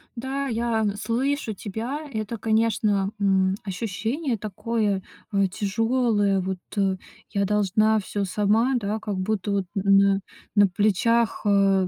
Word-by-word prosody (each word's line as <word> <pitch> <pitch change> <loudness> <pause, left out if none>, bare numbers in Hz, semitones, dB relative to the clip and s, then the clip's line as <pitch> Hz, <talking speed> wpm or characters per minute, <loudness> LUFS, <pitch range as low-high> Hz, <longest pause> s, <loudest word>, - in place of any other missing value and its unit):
Да, 270 +3 -3
я, 230 -1 0
н 205 -1 0
слышу 240 +2 -1
тебя. 225 +9 -4
Это, 220 0 -3
конечно, 215 -2 +1
м, 190 -1 +2
ощущение 225 - -2
такое, 210 -1 -1 0.3
э, 200 -1 +3
тяжёлое. 205 +1 +1
Вот, 190 0 -3 0.2
э, 195 -1 +2 0.3
я 200 -1 +1
должна 210 +2 +2
всё 200 0 -3
сама, 210 +7 +2
да, 215 -2 -1
как 210 -2 -4
будто 200 +1 -1
вот 195 -2 0
на 195 0 +4 0.4
на 205 -1 +6
плечах, 215 +4 +1
э 195 -2 +3
210 Hz, 130 wpm, -24 LUFS, 195-230 Hz, 0.4 s, на